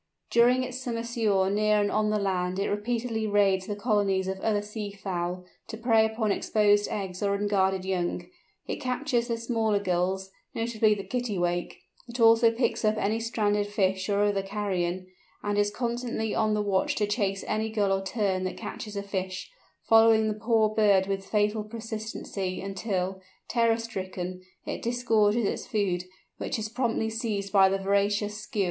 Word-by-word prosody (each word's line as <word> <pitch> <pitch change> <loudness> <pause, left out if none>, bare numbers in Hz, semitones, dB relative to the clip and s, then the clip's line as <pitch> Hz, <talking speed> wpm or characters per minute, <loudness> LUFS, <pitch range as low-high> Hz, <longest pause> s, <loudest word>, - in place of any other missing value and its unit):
During 245 +2 +4
its 255 0 -5
summer 235 -3 -3
sojourn 210 -5 +1
near 210 0 +3
and 205 0 +1
on 215 0 +1
the 215 - +1
land 185 -2 -1
it 195 - -1
repeatedly 225 +1 -1
raids 195 -2 +2
the 205 - -2
colonies 205 -3 +1
of 190 0 -3
other 205 0 0
sea 210 0 -5
fowl, 180 -2 -4 0.2
to 220 - -6
prey 225 -1 +4
upon 220 -1 -1
exposed 205 0 +2
eggs 190 -3 -4
or 200 -1 +1
unguarded 190 -2 +1
young; 180 -2 -1 0.4
it - - -3
captures 250 -2 -1
the 230 -2 -1
smaller 225 -2 0
Gulls, 190 0 -1 0.2
notably 225 -2 +2
the 200 - -6
Kittiwake: 180 -9 -2 0.3
it 240 +1 -7
also 230 0 +6
picks 230 0 -1
up 215 0 +2
any 215 +2 0
stranded 210 -3 0
fish 190 -2 0
or 205 0 +2
other 205 -1 +1
carrion; 190 -3 -2 0.4
and 205 0 -1
is 205 0 +3
constantly 235 0 -2
on 215 -1 +1
the 210 - 0
watch 195 -2 +1
to 210 - +1
chase 200 -2 -1
any 220 +1 -1
Gull 205 -3 +1
or 195 0 -1
Tern 195 -2 -1
that 185 - -4
catches 210 -1 -7
a 200 - -3
fish, 190 - -4 0.4
following 225 -1 +6
the 215 - 0
poor 220 0 +2
bird 205 -3 +3
with 195 0 -2
fatal 210 0 +1
persistency 215 -4 -5
until, 190 -1 -3 0.3
terror 230 -1 +2
stricken, 185 -5 -5 0.2
it - - -4
disgorges 230 -2 +2
its - - -2
food, 185 -4 0 0.3
which - - -2
is 215 0 -4
promptly 230 -2 -1
seized 210 -3 -3
by 195 -1 +6
the 195 - +1
voracious 200 +2 +1
Skua. 210 0 -6
210 Hz, 170 wpm, -27 LUFS, 195-225 Hz, 0.4 s, also